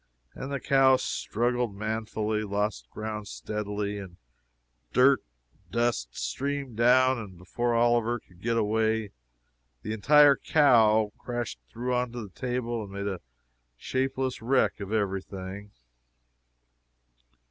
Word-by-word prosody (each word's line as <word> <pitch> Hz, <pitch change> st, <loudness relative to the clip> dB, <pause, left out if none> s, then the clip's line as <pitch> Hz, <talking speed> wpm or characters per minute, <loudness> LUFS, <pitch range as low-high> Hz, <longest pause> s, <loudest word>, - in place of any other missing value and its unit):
and 135 Hz, +1 st, -6 dB
the 140 Hz, -, -2 dB
cow 135 Hz, -1 st, +5 dB
struggled 120 Hz, -2 st, -1 dB
manfully 110 Hz, 0 st, -2 dB
lost 100 Hz, -, -2 dB
ground 105 Hz, -, -5 dB
steadily 105 Hz, -1 st, -4 dB, 0.9 s
dirt 130 Hz, +2 st, +5 dB, 0.3 s
and -, -, -33 dB
dust 115 Hz, -, -1 dB
streamed 135 Hz, -, -3 dB
down, 130 Hz, +2 st, +4 dB
and 100 Hz, -5 st, -9 dB
before 120 Hz, +7 st, -1 dB
Oliver 120 Hz, 0 st, +2 dB
could 90 Hz, -3 st, -23 dB
get 115 Hz, +2 st, 0 dB
well 115 Hz, -, +2 dB
away, 110 Hz, 0 st, 0 dB, 0.7 s
the 110 Hz, -, -3 dB
entire 145 Hz, +6 st, +6 dB
cow 110 Hz, -9 st, +4 dB
crashed 120 Hz, -1 st, -4 dB
through 125 Hz, +2 st, -3 dB
on 125 Hz, -1 st, 0 dB
to 120 Hz, -, -5 dB
the 105 Hz, -, -9 dB
table 120 Hz, -2 st, -2 dB
and 100 Hz, -, -10 dB
made 100 Hz, 0 st, -4 dB
a 95 Hz, -3 st, -4 dB, 0.6 s
shapeless 130 Hz, -, -2 dB
wreck 130 Hz, +1 st, +2 dB
of 100 Hz, 0 st, -6 dB
every 100 Hz, -3 st, 0 dB
thing! 95 Hz, +2 st, -8 dB
110 Hz, 125 wpm, -28 LUFS, 105-125 Hz, 0.9 s, entire